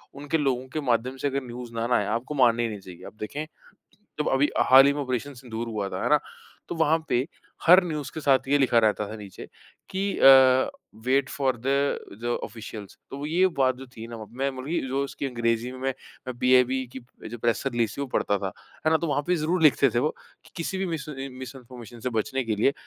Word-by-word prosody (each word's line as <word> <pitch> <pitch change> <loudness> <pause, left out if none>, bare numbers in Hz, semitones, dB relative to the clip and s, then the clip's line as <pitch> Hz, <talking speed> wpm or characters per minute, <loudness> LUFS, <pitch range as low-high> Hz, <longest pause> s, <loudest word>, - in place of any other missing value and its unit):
उनके 145 +3 -1
लोगों 130 -3 0
के 155 - -1
माध्यम 125 +3 0
से 145 - -1
अगर 135 0 -2
न्यूज़ 120 0 -8
ना 115 0 -1
ना 125 - +2
आए, 105 - 0
आपको 115 +8 -3
माननी 120 -3 +4
ही 115 - 0
नहीं 105 -2 -6
चाहिए। 90 -2 -12
आप - - -12
देखें 145 +8 -4 0.8
जब 150 - +1
अभी 135 +2 +3 0.2
हाल 135 +1 +9
ही 140 - +4
में 145 - -3
ऑपरेशन 130 +2 -3
सिंदूर 120 -2 -6
हुआ 105 -3 -3
था, - - -5
है - - 0
ना? - - +6 0.5
तो - - -3
वहाँ 160 0 +3
पे 125 +3 +1 0.4
हर 180 +3 +8
न्यूज़ 150 -5 -4
के 160 - -4
साथ 135 -3 +3
ये 145 +1 +4
लिखा 125 -4 +3
रहता 105 -2 +2
था 110 - -7
नीचे 100 -3 -10 0.4
कि 190 - -2 0.2
अ, 130 -1 +7 0.4
"वेट 135 +1 +2
फोर 130 -3 0
दा 135 - +2 0.5
दा 120 - -1 0.2
ऑफ़िशियल्स" 110 -3 -9
तो 140 +1 -6
ये 175 +5 +3
बात 130 -1 +3
जो 135 +1 -10
थी 115 +1 -7
ना 115 - -7
वहाँ 110 -1 -8
पे, 115 - -20
मैं 135 +1 +1
मरी 160 +6 -1
जो 135 +2 0
उसकी 140 - -5
अंग्रेजी 120 -1 -1
में 130 - -9
मैं 135 0 0 0.5
बीआईबी 130 +1 +3
की 130 - -7 0.3
जो 120 - -7
प्रेस 115 0 0
रिलीज़ 120 -4 0
थी - - -5
वो 140 - -2
पढ़ता 100 - +1
था, 95 -1 -4 0.3
है - - +5
ना। 160 - +5
तो 170 - -3
वहाँ 145 -1 0
पे 180 - +2
ज़रूर 165 +2 0
लिखते 140 -3 +5
थे - - +3
वो 150 +5 0 0.4
किसी 175 +3 -3
भी 190 - -1
मिस 160 -4 -4
ए 135 -2 -5
मिसइन्फॉर्मेशन 125 -2 -10
से 125 - -2
बचने 135 +4 -1
के 110 -2 -1
लिए 125 +6 +3
130 Hz, 235 wpm, -26 LUFS, 115-140 Hz, 0.8 s, हाल